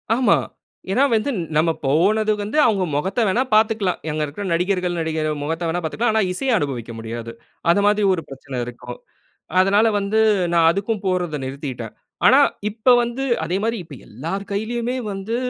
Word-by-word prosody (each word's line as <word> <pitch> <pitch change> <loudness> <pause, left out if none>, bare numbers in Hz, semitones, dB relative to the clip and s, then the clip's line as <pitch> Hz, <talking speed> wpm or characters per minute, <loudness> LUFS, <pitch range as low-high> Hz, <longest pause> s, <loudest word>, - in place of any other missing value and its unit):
ஆமா. 250 +1 +4 0.6
ஏன்னா, 255 +7 +3
வந்து 225 0 0 0.2
நம்ம 165 +2 +3
போனது 205 +10 +2
வந்து 215 +9 -3
அவுங்க 200 -5 +2
முகத்த 190 +11 -1
வேணா 230 +7 +2
பார்த்துக்கலாம். 215 -4 +2
அங்க 155 0 -1
இருக்கிற 150 +8 -7
நடிகர்கள், 180 0 0
நடிகை 160 -1 -2 0.2
முகத்த 165 +2 -2
வேணா 175 +2 -1
பாத்துக்கலாம். 220 +8 0
ஆனா 220 - +3
இசைய 250 +4 +1
அனுபவிக்க 125 - -3
முடியாது. 115 +1 -6 0.4
அது 200 +4 +3
மாதிரி 210 0 +3
ஒரு 175 - -2
பிரச்சனை 135 -1 -8
இருக்கும். 125 0 -9 0.6
அதனால 200 +4 +4
வந்து 200 +2 0 0.3
நான் 165 -1 +5
அதுக்கும் 200 +3 -2
போறத 180 -5 -1
நிறுத்திட்டேன். 130 -4 -6 0.3
ஆனா, - - +7 0.3
இப்ப 220 +4 0
வந்து 240 +3 -3 0.2
அதேமாரி 205 +7 -1
இப்ப 155 -4 -11
எல்லார் 165 - -5
கையிலேயுமே 235 +4 -2 0.2
வந்து 195 +4 -4
185 Hz, 155 wpm, -21 LUFS, 155-220 Hz, 0.6 s, ஆனா